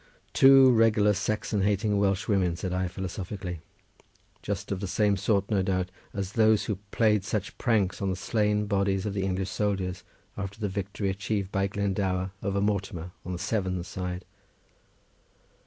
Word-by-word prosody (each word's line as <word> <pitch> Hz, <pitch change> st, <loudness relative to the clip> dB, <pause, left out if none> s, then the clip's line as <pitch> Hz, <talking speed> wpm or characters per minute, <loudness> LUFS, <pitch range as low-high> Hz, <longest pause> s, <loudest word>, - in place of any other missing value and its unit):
"Two 135 Hz, -1 st, +8 dB
regular 110 Hz, -3 st, +4 dB
Saxon 105 Hz, +1 st, -1 dB
hating 105 Hz, +1 st, +1 dB
Welsh 100 Hz, 0 st, +1 dB
women," 95 Hz, -5 st, +2 dB
said 90 Hz, +1 st, -4 dB
I, 90 Hz, 0 st, 0 dB
philosophically; 90 Hz, -1 st, -5 dB, 0.8 s
"just -, -, -4 dB
the 100 Hz, 0 st, -2 dB
same 105 Hz, +2 st, +2 dB
sort, 100 Hz, +1 st, 0 dB
no 100 Hz, -3 st, +3 dB
doubt, 95 Hz, -1 st, -1 dB, 0.2 s
as 100 Hz, -2 st, -4 dB
those 110 Hz, -1 st, +4 dB
who 105 Hz, -, -2 dB
played 105 Hz, -2 st, +2 dB
such 100 Hz, 0 st, -3 dB
pranks 105 Hz, -7 st, +1 dB
on 100 Hz, -, 0 dB
the 95 Hz, -, -1 dB
slain 105 Hz, +1 st, 0 dB
bodies 100 Hz, -1 st, 0 dB
of 105 Hz, -, -2 dB
the 100 Hz, -, -1 dB
English 95 Hz, 0 st, -2 dB
soldiers, 95 Hz, -3 st, -1 dB, 0.3 s
after 100 Hz, +1 st, -6 dB
the 105 Hz, -2 st, -1 dB
victory 100 Hz, +1 st, -2 dB
achieved 100 Hz, 0 st, -2 dB
by 95 Hz, 0 st, +1 dB
Glendower 95 Hz, -2 st, -1 dB
over 100 Hz, 0 st, -1 dB
Mortimer 100 Hz, -4 st, -2 dB
on 90 Hz, -, -5 dB
the -, -, -3 dB
Severn's 95 Hz, -3 st, -2 dB
side." 90 Hz, 0 st, -5 dB
100 Hz, 155 wpm, -27 LUFS, 95-105 Hz, 0.8 s, Two